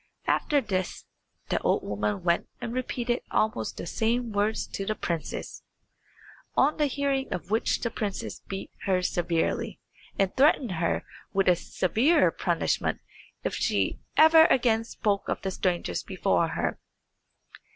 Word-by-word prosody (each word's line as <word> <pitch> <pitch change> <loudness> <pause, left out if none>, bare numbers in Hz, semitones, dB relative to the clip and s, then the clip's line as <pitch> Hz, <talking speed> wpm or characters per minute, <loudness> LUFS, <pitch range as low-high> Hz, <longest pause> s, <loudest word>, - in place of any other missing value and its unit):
After 290 -2 +2
this 185 -6 -3 0.4
the - - 0
old - - +1
woman 105 0 -2
went 170 0 +1
and 235 -1 -4
repeated 245 -1 -1
almost 220 +2 0
the - - -5
same 235 +1 0
words 210 +2 0
to 195 - -4
the 215 +2 -1
princess, 170 -6 -4 1.0
on 290 +3 +4
the 300 -2 +2
hearing 275 0 -1
of 180 - -5
which 220 - +1
the 235 - -1
princess 205 -4 -4
beat 195 0 -6
her 185 -2 +2
severely; 170 -2 -1 0.4
and 195 -1 +1
threatened 270 -4 +4
her 170 -1 -1 0.3
with 195 -1 +2
a 180 - +6
severer 220 - +2
punishment - - 0 0.4
if - - -1
she - - 0 0.2
ever 320 0 +8
again 230 -5 +3
spoke 205 -3 -1
of - - -1
the 190 - -1
strangers 175 - -1
before - - +1
her. - - -2
215 Hz, 140 wpm, -27 LUFS, 185-250 Hz, 1.0 s, ever